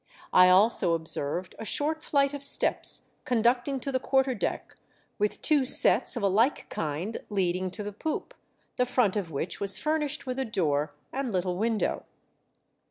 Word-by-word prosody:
I 180 Hz, 0 st, +7 dB
also 185 Hz, -2 st, +4 dB
observed 160 Hz, +2 st, -1 dB
a -, -, -6 dB
short 305 Hz, +8 st, 0 dB
flight 280 Hz, -2 st, 0 dB
of 285 Hz, -, -6 dB
steps 280 Hz, -, +3 dB
conducting 245 Hz, +3 st, 0 dB
to 275 Hz, -, -4 dB
the 260 Hz, -, 0 dB
quarter 265 Hz, 0 st, +1 dB
deck, 225 Hz, -, -4 dB, 0.4 s
with 210 Hz, 0 st, -2 dB
two 295 Hz, -3 st, +3 dB
sets 255 Hz, -, +4 dB
of 230 Hz, -, -4 dB
a -, -, +3 dB
like 225 Hz, +8 st, +1 dB
kind 160 Hz, +8 st, -4 dB
leading 185 Hz, -2 st, -1 dB
to 185 Hz, +3 st, -5 dB
the 205 Hz, 0 st, -6 dB
poop, 315 Hz, -, -5 dB, 0.4 s
the 250 Hz, -, +2 dB
front 245 Hz, -5 st, +1 dB
of 200 Hz, -5 st, -3 dB
which 160 Hz, +3 st, -4 dB
was 200 Hz, -1 st, +4 dB
furnished 300 Hz, -2 st, -2 dB
with 255 Hz, 0 st, -4 dB
a 265 Hz, -, -1 dB
door 150 Hz, -, -1 dB, 0.2 s
and 265 Hz, -2 st, -3 dB
little 180 Hz, -2 st, -2 dB
window. 220 Hz, +3 st, -2 dB
220 Hz, 165 wpm, -27 LUFS, 185-265 Hz, 0.4 s, I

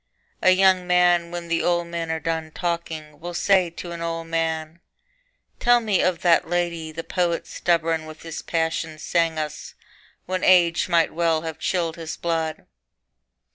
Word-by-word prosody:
A -, -, +5 dB
young 185 Hz, -1 st, +4 dB
man 175 Hz, -1 st, +3 dB
when 175 Hz, 0 st, -6 dB
the 170 Hz, 0 st, 0 dB
old 175 Hz, -1 st, +1 dB
men 170 Hz, -1 st, -4 dB
are 160 Hz, 0 st, -1 dB
done 160 Hz, 0 st, -2 dB
talking 160 Hz, -3 st, -4 dB
Will 175 Hz, +2 st, -6 dB
say 185 Hz, -1 st, +3 dB
to 170 Hz, +1 st, -8 dB
an 170 Hz, 0 st, -6 dB
old 165 Hz, 0 st, -3 dB
man, 165 Hz, 0 st, -2 dB, 0.8 s
'Tell 245 Hz, 0 st, +5 dB
me 215 Hz, -5 st, +1 dB
of 180 Hz, -2 st, 0 dB
that 170 Hz, -2 st, +3 dB
lady 170 Hz, -2 st, -1 dB
The 165 Hz, +1 st, -6 dB
poet 175 Hz, -2 st, -1 dB
stubborn 165 Hz, -2 st, 0 dB
with 155 Hz, 0 st, -11 dB
his 165 Hz, -1 st, -6 dB
passion 160 Hz, -1 st, -2 dB
sang 165 Hz, 0 st, 0 dB
us 155 Hz, -1 st, -5 dB, 0.5 s
When 185 Hz, 0 st, -3 dB
age 175 Hz, -2 st, +4 dB
might 170 Hz, -2 st, +3 dB
well 165 Hz, -1 st, +1 dB
have 160 Hz, -1 st, -6 dB
chilled 170 Hz, -2 st, -1 dB
his 165 Hz, -1 st, -6 dB
blood.' 165 Hz, -2 st, -2 dB
170 Hz, 165 wpm, -23 LUFS, 160-175 Hz, 0.8 s, A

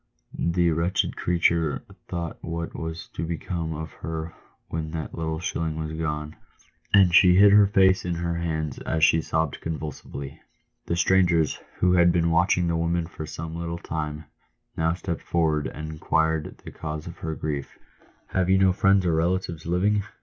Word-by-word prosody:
The 85 Hz, 0 st, +1 dB
wretched 85 Hz, +4 st, 0 dB
creature 85 Hz, -3 st, +1 dB, 0.2 s
thought 85 Hz, -2 st, -4 dB
what 85 Hz, 0 st, -4 dB
was 80 Hz, 0 st, -5 dB
to 80 Hz, -, -5 dB
become 85 Hz, -1 st, -3 dB
of 80 Hz, +1 st, -6 dB
her 80 Hz, 0 st, -5 dB, 0.3 s
when 80 Hz, -1 st, -4 dB
that 80 Hz, -2 st, -4 dB
little 80 Hz, -1 st, -3 dB
shilling 80 Hz, -2 st, -2 dB
was 80 Hz, 0 st, -4 dB
gone, 75 Hz, -1 st, -3 dB, 0.6 s
and 95 Hz, -4 st, +6 dB
she 90 Hz, 0 st, +7 dB
hid 100 Hz, +2 st, +7 dB
her 105 Hz, 0 st, +7 dB
face 95 Hz, -1 st, +4 dB
in 90 Hz, -1 st, -2 dB
her 85 Hz, 0 st, -2 dB
hands 80 Hz, -4 st, -2 dB
as 80 Hz, -1 st, -1 dB
she 80 Hz, +1 st, +5 dB
sobbed 80 Hz, -1 st, -1 dB
convulsively. 75 Hz, -3 st, -6 dB, 0.5 s
The 85 Hz, -, 0 dB
strangers, 85 Hz, -2 st, +3 dB, 0.2 s
who 90 Hz, 0 st, +3 dB
had 85 Hz, -1 st, +5 dB
been 85 Hz, -1 st, +2 dB
watching 90 Hz, +2 st, +3 dB
the 85 Hz, -, 0 dB
woman 85 Hz, +1 st, 0 dB
for 80 Hz, -2 st, -8 dB
some 80 Hz, +1 st, -6 dB
little 85 Hz, 0 st, -4 dB
time, 75 Hz, -2 st, -4 dB, 0.5 s
now 80 Hz, +1 st, +1 dB
stepped 85 Hz, -2 st, -4 dB
forward, 80 Hz, -3 st, +1 dB
and 75 Hz, +1 st, -6 dB
inquired 80 Hz, 0 st, 0 dB
the -, -, -7 dB
cause 75 Hz, -1 st, -6 dB
of 85 Hz, -1 st, -9 dB
her 80 Hz, -1 st, -3 dB
grief. 75 Hz, -3 st, -4 dB, 0.3 s
" -, -, -32 dB
Have 95 Hz, -1 st, +1 dB
you 95 Hz, -, +5 dB
no 95 Hz, -1 st, +4 dB
friends 95 Hz, -1 st, +3 dB
or 85 Hz, -, +2 dB
relatives 85 Hz, -1 st, -1 dB
living 100 Hz, +4 st, +2 dB
85 Hz, 170 wpm, -25 LUFS, 80-90 Hz, 0.6 s, she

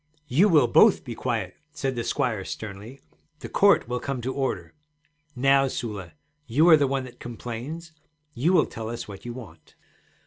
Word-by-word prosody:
'You 165 Hz, +10 st, +4 dB
will 150 Hz, -8 st, +5 dB
both 215 Hz, -, +5 dB
be 120 Hz, -, -5 dB
quiet' 110 Hz, -6 st, -3 dB, 0.2 s
said 135 Hz, -1 st, -2 dB
the 120 Hz, -, -2 dB
squire 115 Hz, -6 st, -1 dB
sternly. 105 Hz, +7 st, -8 dB, 0.4 s
'The -, -, -8 dB
court 200 Hz, -9 st, +4 dB
will 125 Hz, +1 st, -2 dB
come 135 Hz, +1 st, -3 dB
to 130 Hz, +2 st, -3 dB
order. 135 Hz, -1 st, -3 dB, 0.6 s
Now, 135 Hz, +2 st, +4 dB
Sula, 105 Hz, -10 st, -5 dB, 0.3 s
you 145 Hz, +8 st, +3 dB
are 160 Hz, -, +10 dB
the 145 Hz, -2 st, +2 dB
one 135 Hz, 0 st, -1 dB
that 125 Hz, -2 st, -12 dB
complains; 125 Hz, +8 st, -7 dB, 0.4 s
you 140 Hz, +9 st, +1 dB
will 180 Hz, -4 st, +4 dB
tell 110 Hz, -1 st, -7 dB
us 120 Hz, 0 st, -6 dB
what 100 Hz, 0 st, -10 dB
you 120 Hz, -, -5 dB
want.' 110 Hz, -10 st, -12 dB
125 Hz, 175 wpm, -25 LUFS, 115-140 Hz, 0.6 s, are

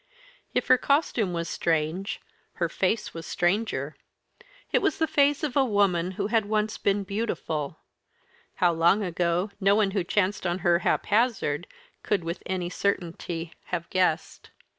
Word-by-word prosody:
If 250 Hz, -, +1 dB
her 255 Hz, 0 st, +5 dB
costume 265 Hz, -, +1 dB
was 170 Hz, -1 st, -2 dB
strange, 165 Hz, +5 st, -1 dB, 0.3 s
her 170 Hz, -, -1 dB
face 190 Hz, +6 st, -1 dB
was 165 Hz, -1 st, -7 dB
stranger. 175 Hz, -6 st, 0 dB, 0.8 s
It -, -, +3 dB
was -, -, +1 dB
the 320 Hz, -, +2 dB
face 290 Hz, -1 st, +2 dB
of 290 Hz, -5 st, -2 dB
a 275 Hz, -, +5 dB
woman 195 Hz, -6 st, +1 dB
who -, -, -2 dB
had 220 Hz, 0 st, +1 dB
once 215 Hz, 0 st, 0 dB
been 200 Hz, 0 st, +1 dB
beautiful 190 Hz, -8 st, -3 dB, 0.8 s
how 175 Hz, -1 st, +3 dB
long 170 Hz, +6 st, +3 dB
ago, 175 Hz, +2 st, 0 dB
no 200 Hz, 0 st, +4 dB
one 210 Hz, -2 st, +2 dB
who 195 Hz, -2 st, 0 dB
chanced 190 Hz, +1 st, 0 dB
on 175 Hz, +1 st, 0 dB
her 170 Hz, -1 st, +4 dB
haphazard 225 Hz, -, +1 dB, 0.3 s
could 200 Hz, -5 st, 0 dB
with 170 Hz, +2 st, -4 dB
any 185 Hz, -2 st, -2 dB
certainty 175 Hz, -3 st, -3 dB
have 170 Hz, -1 st, -3 dB
guessed. 180 Hz, -3 st, 0 dB
190 Hz, 150 wpm, -26 LUFS, 170-215 Hz, 0.8 s, her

